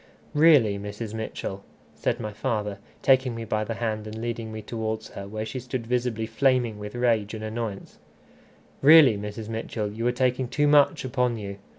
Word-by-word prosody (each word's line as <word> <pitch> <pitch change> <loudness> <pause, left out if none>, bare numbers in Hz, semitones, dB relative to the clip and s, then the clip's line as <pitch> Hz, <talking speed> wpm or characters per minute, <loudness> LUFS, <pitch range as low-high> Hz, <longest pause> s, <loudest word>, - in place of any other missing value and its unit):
"Really, 145 -10 +5
Mrs. 105 +2 -6
Mitchell," 105 -3 -5 0.3
said - - -1
my 105 -1 -5
father, 105 -3 -2 0.2
taking 130 -2 +4
me 115 0 -5
by 110 0 -1
the 115 +1 -4
hand 110 -2 -3
and 110 +1 -7
leading 115 -1 -4
me 110 -1 -7
towards 110 0 -4
her, 100 0 -8
where 110 +2 -4
she 115 +4 -5
stood 125 -1 -5
visibly 120 -2 -1
flaming 120 -1 +1
with 105 +2 -7
rage 115 -3 +1
and 110 - -7
annoyance, 110 -2 -5 0.8
"really, 145 -5 +8
Mrs. 105 +2 -6
Mitchell, 110 -1 -3
you 115 +3 -2
are - - +3
taking 125 0 0
too 145 +4 +1
much 145 -2 +4
upon 125 -2 0
you! 100 -2 -6
115 Hz, 180 wpm, -26 LUFS, 105-125 Hz, 0.8 s, really